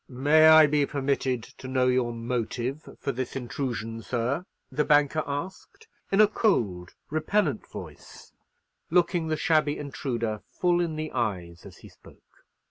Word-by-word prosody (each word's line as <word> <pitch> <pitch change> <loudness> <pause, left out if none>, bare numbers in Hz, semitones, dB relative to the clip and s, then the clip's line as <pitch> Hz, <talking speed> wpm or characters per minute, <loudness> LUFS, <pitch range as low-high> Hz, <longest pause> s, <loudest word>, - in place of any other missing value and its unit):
"May 145 +5 +5
I 160 0 +9
be 145 -1 +1
permitted 135 -4 -1 0.2
to 130 - -8
know 130 -1 +1
your 125 -1 +2
motive 120 +4 -3
for 140 - -2
this 130 -1 -5
intrusion, 120 -3 -4
sir?" 125 +10 -2 0.2
the 145 +3 +1
banker 150 +1 +3
asked, 185 - -6 0.2
in 195 - +2
a 215 - +8
cold, 105 - 0 0.2
repellent 155 - 0
voice, - - -11 0.6
looking 175 -1 +2
the 155 0 -1
shabby 150 -2 +2
intruder 120 -6 -3
full 175 -1 +1
in 165 -2 -2
the 155 0 -4
eyes 90 -8 -3
as - - -14
he - - -10
spoke. - - -21
140 Hz, 145 wpm, -27 LUFS, 120-155 Hz, 0.6 s, I